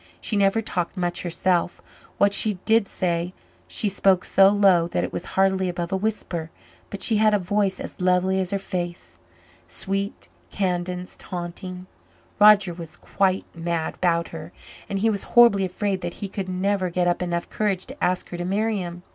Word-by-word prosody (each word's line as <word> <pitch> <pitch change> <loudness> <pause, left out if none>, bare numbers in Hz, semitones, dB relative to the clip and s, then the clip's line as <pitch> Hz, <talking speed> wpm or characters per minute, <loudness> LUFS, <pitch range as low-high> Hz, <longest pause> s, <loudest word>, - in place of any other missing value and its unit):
She 215 - -3
never 200 +2 +3
talked 180 -3 -3
much 175 -1 -1
herself; 175 0 0 0.4
what 200 0 +4
she 210 0 0
did 225 -2 +4
say 175 -1 -2 0.3
she 215 - -2
spoke 195 -2 +2
so 195 0 +6
low 195 -4 +4
that - - -1
it - - -4
was - - -4
hardly 190 -1 +3
above 175 0 -4
a - - +1
whisper, 190 -5 -3 0.4
but 200 - -5
she 225 - +2
had 215 0 +4
a - - +4
voice 195 +1 0
as - - -8
lovely 185 +1 +2
as 185 -2 -1
her 200 - 0
face 180 -3 -5 0.5
sweet, 195 +1 -3 0.2
cadenced, 180 -1 -3
haunting. 180 +1 -6 0.5
Roger 205 -3 +6
was 165 -2 -9
quite 190 -1 0
mad 165 -1 -2
about 170 -2 0
her, 165 0 -8 0.4
and 195 - -1
he 220 +3 +2
was 200 -2 -2 0.2
horribly 230 -5 +7
afraid 190 +1 -2
that 175 - -4
he 200 - -5
could 190 -1 -5
never 185 0 0
get 175 +1 0
up 175 0 +1
enough 175 -1 -2
courage 200 -4 -1
to 270 +3 -9
ask 180 0 +1
her 175 - -6
to 175 - -3
marry 210 +4 0
him. 175 -1 -6
185 Hz, 180 wpm, -24 LUFS, 175-200 Hz, 0.5 s, horribly